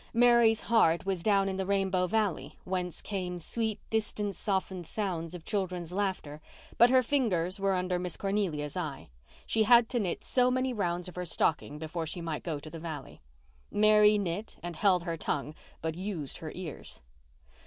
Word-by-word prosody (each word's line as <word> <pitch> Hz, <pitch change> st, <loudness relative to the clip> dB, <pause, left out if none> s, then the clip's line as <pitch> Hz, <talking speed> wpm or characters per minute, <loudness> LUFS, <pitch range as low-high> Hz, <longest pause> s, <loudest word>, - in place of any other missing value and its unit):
Mary's 235 Hz, -2 st, +5 dB
heart 180 Hz, -8 st, +3 dB
was 190 Hz, -3 st, -1 dB
down 200 Hz, 0 st, +3 dB
in 190 Hz, -1 st, -2 dB
the 190 Hz, -, -1 dB
Rainbow 195 Hz, -2 st, +1 dB
Valley, 195 Hz, -8 st, -1 dB
whence 180 Hz, -2 st, -3 dB
came 180 Hz, -3 st, -3 dB
sweet, 220 Hz, +5 st, -2 dB
distance 210 Hz, -2 st, -1 dB
softened 190 Hz, -3 st, -2 dB
sounds 175 Hz, -5 st, -3 dB
of 170 Hz, -, -10 dB
children's 180 Hz, -4 st, -2 dB
laughter, 185 Hz, -6 st, -2 dB, 0.4 s
but 235 Hz, -, +8 dB
her 255 Hz, 0 st, +5 dB
fingers 200 Hz, -9 st, 0 dB
were 195 Hz, -1 st, +2 dB
under 180 Hz, 0 st, 0 dB
Miss 180 Hz, -2 st, -5 dB
Cornelia's 185 Hz, -8 st, -1 dB
eye. 155 Hz, -7 st, -4 dB, 0.4 s
She 225 Hz, -, +1 dB
had 235 Hz, +1 st, +6 dB
to 245 Hz, -, 0 dB
knit 185 Hz, -6 st, -2 dB
so 250 Hz, -1 st, +3 dB
many 255 Hz, 0 st, 0 dB
rounds 180 Hz, -5 st, -1 dB
of 180 Hz, -, -10 dB
her 180 Hz, -, -2 dB
stocking 150 Hz, -3 st, 0 dB
before 160 Hz, +1 st, -4 dB
she 175 Hz, -, -4 dB
might 165 Hz, -2 st, -3 dB
go 160 Hz, -4 st, -3 dB
to 145 Hz, +2 st, -9 dB
the 165 Hz, -, -7 dB
valley. 155 Hz, -4 st, -7 dB, 0.5 s
Mary 210 Hz, 0 st, +5 dB
knit 200 Hz, +2 st, -3 dB
and 175 Hz, -1 st, -5 dB
held 180 Hz, 0 st, +3 dB
her 170 Hz, -2 st, -3 dB
tongue, 150 Hz, -1 st, -2 dB, 0.3 s
but 160 Hz, 0 st, -1 dB
used 175 Hz, -5 st, -5 dB
her 155 Hz, -1 st, -7 dB
ears. 175 Hz, -5 st, -8 dB
185 Hz, 175 wpm, -30 LUFS, 170-210 Hz, 0.5 s, but